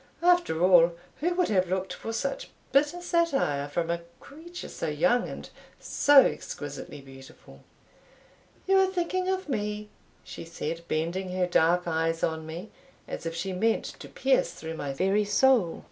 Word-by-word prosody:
After 350 - +3
all, 175 -2 +6 0.3
who 350 +3 0
would 360 -1 +1
have 185 -3 +2
looked 190 +1 -2
for 225 - -6
such 275 +5 -3 0.2
bitter 295 +6 +2
satire 275 - +1
from 165 +3 -2
a 170 0 -2 0.2
creature 345 +5 -10
so 165 - -5
young, 160 +11 +2
and - - -8 0.3
so 285 -1 +6
exquisitely 145 0 -5
beautiful?" 135 -1 -15 1.0
"You 385 0 +4
are 380 - +4
thinking 370 0 -1
of 380 -1 -1
me," 210 -4 -3 0.3
she - - -9
said, 165 0 -5
bending 175 +4 -2
her 180 - +2
dark 175 0 +2
eyes 165 0 0
on 160 -1 -1
me, 170 +7 -7 0.4
as - - -5
if 165 - -4
she 185 +3 -3
meant 220 +5 +1
to - - -10
pierce - - +1
through 160 0 -7
my 145 -3 -4
very 195 +9 +1
soul. 205 -2 +3
190 Hz, 160 wpm, -27 LUFS, -, 1.0 s, all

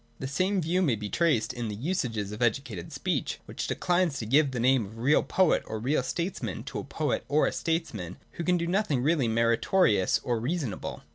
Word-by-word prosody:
The - - -6
same 185 +8 +1
view 175 +4 +1
may 145 -10 +2
be 105 -1 -5
traced 150 -10 +1
in 120 -2 -4
the 105 - -4
usages 115 - -2
of 105 +3 -7
educated 120 -6 -1
speech, - - -2
which - - -5
declines 175 -4 +1
to 110 - -4
give 140 +6 +4
the 125 -2 -4
name 130 0 +3
of 105 +3 -10
real 135 +6 +3
poet 185 -3 +2
or 110 - -4
real 130 +6 +1
statesman 130 - -3
to - - -5
a - - -5
poet - - -2
or 145 +3 +3
a - - +1
statesman 160 - -3
who 170 - -5
can 180 +1 +2
do 170 - -1
nothing 170 - 0
really 150 -4 +2
meritorious 115 - +3
or 120 -2 0
reasonable. 130 - -3
130 Hz, 205 wpm, -28 LUFS, 115-170 Hz, -, give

